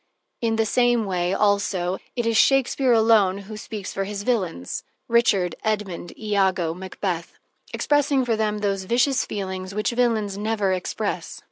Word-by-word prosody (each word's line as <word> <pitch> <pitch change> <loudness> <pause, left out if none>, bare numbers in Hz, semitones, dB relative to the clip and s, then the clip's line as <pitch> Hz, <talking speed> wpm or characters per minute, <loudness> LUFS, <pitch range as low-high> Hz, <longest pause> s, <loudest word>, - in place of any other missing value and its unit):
In 225 -1 +1
the 225 0 +2
same 240 0 +2
way, 180 -2 -1
also, 195 -3 +1 0.2
it 240 -2 -1
is 230 0 +1
Shakespeare 265 +2 +3
alone 220 -4 +4
who 200 +2 -8
speaks 210 -2 -6
for 195 - -2
his 200 0 -5
villains: 185 - -2 0.2
Richard, 205 -7 +3
Edmund, 205 -5 -3
Iago, 190 -6 +1
Macbeth, 180 -1 -4 0.4
expressing 285 -2 +2
for 230 -2 +1
them 210 -1 -1
those 195 -2 -1
vicious 250 +5 +2
feelings 190 -1 -5
which 210 +3 0
villains 225 -5 0
never 210 -3 0
express. 180 -1 -3
210 Hz, 145 wpm, -23 LUFS, 190-230 Hz, 0.4 s, alone